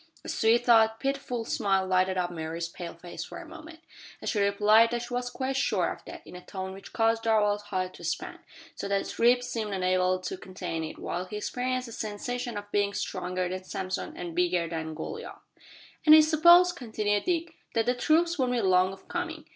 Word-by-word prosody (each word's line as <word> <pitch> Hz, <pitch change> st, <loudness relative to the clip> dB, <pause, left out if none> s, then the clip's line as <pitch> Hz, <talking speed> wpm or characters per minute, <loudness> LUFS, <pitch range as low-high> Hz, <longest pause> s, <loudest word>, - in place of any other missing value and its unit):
A -, -, -6 dB
sweet 230 Hz, +2 st, +2 dB
though 225 Hz, -2 st, +6 dB
pitiful 270 Hz, -4 st, -2 dB
smile 195 Hz, -3 st, +1 dB
lighted 185 Hz, 0 st, +2 dB
up 180 Hz, -1 st, 0 dB
Mary's 165 Hz, 0 st, -4 dB
pale 170 Hz, 0 st, -8 dB
face 170 Hz, 0 st, -8 dB
for -, -, -9 dB
a 340 Hz, -, -9 dB
moment, 320 Hz, 0 st, -12 dB, 0.4 s
as -, -, -2 dB
she 210 Hz, -, -1 dB
replied 210 Hz, +3 st, +5 dB
that 240 Hz, 0 st, -2 dB
she 245 Hz, +1 st, -7 dB
was 245 Hz, 0 st, -1 dB
quite 265 Hz, +1 st, -3 dB
sure 270 Hz, -, +1 dB
of -, -, -16 dB
that, -, -, -10 dB
in -, -, -11 dB
a 180 Hz, -, -9 dB
tone 190 Hz, 0 st, -6 dB
which 195 Hz, -, -11 dB
caused 225 Hz, 0 st, +2 dB
Darvall's 210 Hz, -2 st, +2 dB
heart 185 Hz, -2 st, -2 dB
to -, -, -13 dB
expand, -, -, -4 dB, 0.3 s
so -, -, -5 dB
that 200 Hz, 0 st, +1 dB
his -, -, -5 dB
ribs 245 Hz, +1 st, +4 dB
seemed 215 Hz, -3 st, -3 dB
unable 185 Hz, 0 st, +2 dB
to 185 Hz, 0 st, -5 dB
contain 185 Hz, -3 st, -5 dB
it, 160 Hz, -, -6 dB
while 180 Hz, +1 st, -4 dB
he 210 Hz, +3 st, -6 dB
experienced 255 Hz, +3 st, -2 dB
a -, -, -9 dB
sensation 235 Hz, +3 st, -4 dB
of 205 Hz, 0 st, -8 dB
being 200 Hz, 0 st, +1 dB
stronger 185 Hz, -1 st, -2 dB
than 185 Hz, +1 st, -5 dB
Samson 185 Hz, 0 st, -4 dB
and 175 Hz, -1 st, -5 dB
bigger 175 Hz, 0 st, +1 dB
than 160 Hz, -1 st, -4 dB
Goliath! 440 Hz, -, -7 dB, 0.7 s
"And 310 Hz, 0 st, +9 dB
I 315 Hz, -, +9 dB
suppose," 345 Hz, +3 st, +6 dB
continued 215 Hz, -9 st, -1 dB
Dick, 335 Hz, -2 st, -1 dB, 0.2 s
"that 225 Hz, -1 st, +2 dB
the 245 Hz, -, +2 dB
troops 325 Hz, +6 st, +2 dB
won't 250 Hz, -1 st, +1 dB
be 240 Hz, -, +1 dB
long 185 Hz, -1 st, +3 dB
of 190 Hz, -, -15 dB
coming. 335 Hz, -3 st, -4 dB
210 Hz, 210 wpm, -28 LUFS, 185-250 Hz, 0.7 s, And